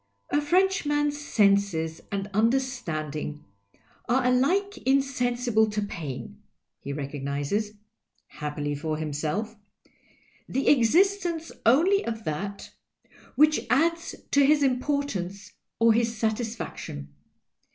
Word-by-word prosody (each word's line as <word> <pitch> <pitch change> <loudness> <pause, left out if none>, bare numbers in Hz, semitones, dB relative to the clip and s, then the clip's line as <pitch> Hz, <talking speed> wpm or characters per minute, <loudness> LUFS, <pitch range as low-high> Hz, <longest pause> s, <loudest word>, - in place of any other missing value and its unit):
" 100 - -46
A 290 - +2
Frenchman's 295 -4 +1
senses 200 - +2
and 200 -1 -2
understanding 180 - -1 0.6
are 255 +1 +2
alike 345 +12 +2
insensible 245 -4 +1
to 210 0 -2
pain 170 -11 -6 0.2
— - - -58
he 140 - -4
recognizes 145 +8 -3 0.5
(happily 150 0 -4
for 155 +2 -3
him 155 -1 -4
self) 200 +10 -3 0.9
the 270 - -1
exis 350 - +4
tence 330 -2 -3 0.2
only 350 +12 +4
of 225 -1 -4
that 200 +6 -4 0.6
which 305 0 +5
adds 330 +5 +1 0.2
to 280 - +5
his 290 +1 +4
importance 250 -8 -1 0.2
or 230 0 +5
his 230 0 0
satisfaction. 220 - -4
225 Hz, 110 wpm, -26 LUFS, -, 0.9 s, which